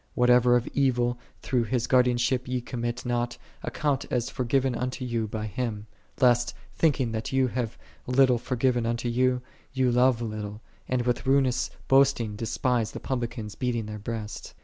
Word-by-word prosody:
"1 125 - +1
Whatever 125 0 +5
of 120 -1 +1
evil 125 -3 +1 0.2
through 125 -2 +1
His 120 +1 0
guardianship 125 0 +2
ye 125 0 -1
commit 120 0 -4
not, 120 0 -1 0.3
iit 145 -4 -1
as 120 -1 -1
forgiven 130 +1 +1
unto 125 +2 -3
yon 115 -2 -1
by 110 +1 -4
Him: 105 -1 -3 0.3
lest, 120 -2 +3 0.2
thinking 135 -7 +1
that 110 0 -3
you 130 -1 +2
have 120 -2 -3 0.3
little 125 -1 +4
forgiven 125 -1 0
unto 120 +1 -1
you, 125 +1 +1 0.3
ye 130 -1 +1
love 125 0 +4
little, 105 -2 -5 0.3
and 125 -1 0
with 125 +1 -1
ruinous 135 -2 +2 0.2
hoisting 130 -5 +3
despise 115 +1 -1
the - - -5
publicans 120 -5 -4
beating 120 -1 -2
their 105 0 -6
breasts. 110 0 -6
120 Hz, 160 wpm, -27 LUFS, 115-130 Hz, 0.3 s, Whatever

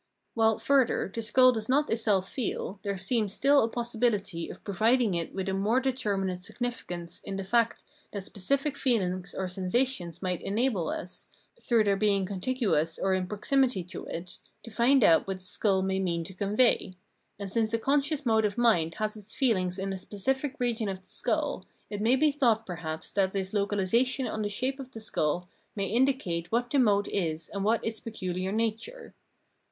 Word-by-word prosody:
While, 225 -1 +3
further, 245 -3 +2
the 230 - -3
skull 255 +3 +6
does 220 -2 -3
not 290 +3 +2
itself 210 -4 +2
feel, 210 -5 -3
there 200 -1 -2
seems 200 +1 0
still 280 0 +4
a 225 - 0
possibihty 220 -7 -1
of - - -10
providing 220 +2 +2
it 170 -1 -2
with 190 0 -3
a 190 - 0
more 205 +6 +2
determinate 200 -9 -1
significance 180 -6 -5
in 195 - -5
the 195 - -3
fact 230 +4 +1 0.3
that 200 -2 -5
specific 275 +10 -1
feelings 190 -9 0
or 190 - -2
sensations 185 -1 -1
might 180 -2 -2
enable 205 -4 0
us, 180 - -6 0.3
through 230 -3 +3
their 200 -1 +2
being 200 -2 +2
contiguous 185 - 0
or 190 0 +1
in 185 -1 0
proximity 240 0 +1
to 180 - -8
it, 175 +2 -7 0.2
to 230 - -10
find 245 +3 +4
out 165 -2 +5
what 195 -1 -2
the 185 - -15
skull 190 +1 +1
may 190 0 0
mean 170 -3 -1
to 190 - -8
convey; 200 0 +2 0.4
and 200 -2 -6
since 220 0 +1
a 230 - +2
con 280 +5 +2
scious 290 0 -2
mode 220 -2 +3
of 205 0 -1
mind 175 -9 +3
has 215 0 -2
its 210 0 -10
feehng 185 -8 +1
in 195 0 -3
a - - -4
specific 265 +9 -2
region 235 -4 0
of 190 -1 -5
the - - -29
skull, - - -1 0.3
it 205 0 -3
may 235 +4 +4
be 300 +3 +3
thought 235 -6 +2
perhaps 160 -4 -5
that 190 -2 +1
this 195 0 -2
localisation 210 +6 +1
on 215 - -3
the 205 - -1
shape 260 +7 -2
of 265 -2 -7
the 225 - -7
skull 175 -4 -1 0.3
may 200 -2 -1
indi 255 +7 +3
cate 175 -9 -4
what 240 +1 0
that 285 - +3
mode 205 -4 +3
is 165 -4 -2
and 200 -1 -2
what 225 +3 +1
its 225 -1 -3
pecuhar 185 -4 -4
nature. 225 - -3
210 Hz, 190 wpm, -28 LUFS, 190-240 Hz, 0.4 s, skull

